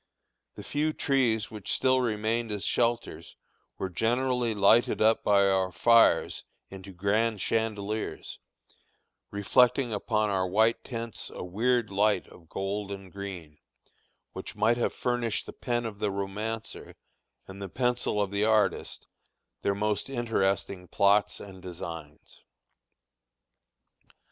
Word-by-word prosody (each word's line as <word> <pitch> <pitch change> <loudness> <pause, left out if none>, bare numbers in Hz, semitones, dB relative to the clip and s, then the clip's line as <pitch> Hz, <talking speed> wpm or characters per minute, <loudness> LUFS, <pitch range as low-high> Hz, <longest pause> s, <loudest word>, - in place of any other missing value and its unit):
The - - -9
few 155 +2 -1
trees 125 -8 +1
which 105 -3 -5
still 130 0 +3
remained 110 0 -1
as 105 -1 -3
shelters 115 -7 -1 0.4
were 95 - -2
generally 120 +2 0
lighted 105 +4 +4
up 110 +1 +3
by 100 -1 +4
our 95 -1 +1
fires 115 +6 +4 0.3
into 95 0 -10
grand 105 +4 0
chandeliers, 110 0 -2 0.9
reflecting 120 +4 +2
upon 105 0 0
our 95 -1 +1
white 110 +5 +2
tents 115 -2 -5
a - - -7
weird 115 +4 0
light 100 -1 +2
of 80 -2 -17
gold 100 +1 -3
and 95 -2 -8
green, 90 -6 -8 0.7
which 100 - -7
might 110 +3 +2
have 120 - 0
furnished 120 -3 -1
the - - -9
pen 120 -1 -2
of 105 -3 -6
the 105 - 0
romancer, 105 +3 -5 0.5
and 95 +1 -10
the 100 - -5
pencil 125 -2 0
of 100 -1 0
the 100 +1 0
artist, 110 -1 +1 0.6
their 100 - 0
most 105 +4 -1
interesting 100 -7 -1
plots 100 +3 +2
and 95 -2 -11
designs. 85 -4 -9
105 Hz, 125 wpm, -28 LUFS, 95-115 Hz, 0.9 s, lighted